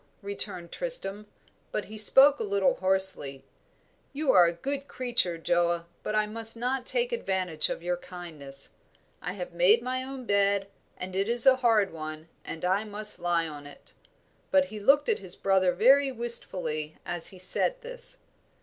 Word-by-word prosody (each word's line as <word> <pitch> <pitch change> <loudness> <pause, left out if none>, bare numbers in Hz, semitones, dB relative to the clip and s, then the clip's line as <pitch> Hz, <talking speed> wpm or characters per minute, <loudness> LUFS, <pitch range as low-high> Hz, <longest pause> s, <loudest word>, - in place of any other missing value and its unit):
returned 200 -3 -3
Tristram; 210 - 0 0.4
but 210 - -3
he 215 - -11
spoke 270 +7 +5
a - - -2
little 200 -2 +1
hoarsely. 190 -8 +1 0.7
"You 285 -1 +1
are 180 -5 +6
a - - 0
good 275 +11 -5
creature, 240 -9 -1
Joa, 170 0 0 0.2
but 215 - -4
I 215 0 +2
must 225 +1 -5
not 250 +2 -2
take - - 0
advantage 185 - 0
of - - -5
your 175 0 -1
kindness. 155 -7 -8 0.5
I 180 - -4
have 180 -3 -7
made 190 +7 +4
my 255 +1 -2
own 260 -1 -8
bed, 200 -1 +1 0.3
and 185 0 -7
it 195 +3 -1
is 235 +1 +7
a 265 -1 +6
hard 225 -7 +2
one, 155 0 -8
and 165 +2 -6
I 190 +3 +1
must 210 -1 +3
lie 170 -1 0
on 145 -2 -9
it." 145 - -15 0.6
But 285 -1 +3
he 215 - -6
looked 275 +8 +3
at 450 -2 +1
his - - -8
brother 190 -2 +2
very 265 +9 +4
wistfully 185 -10 -3
as 175 -1 -1
he 190 - -5
said 340 - -1
this. - - -5
200 Hz, 170 wpm, -27 LUFS, 175-250 Hz, 0.7 s, is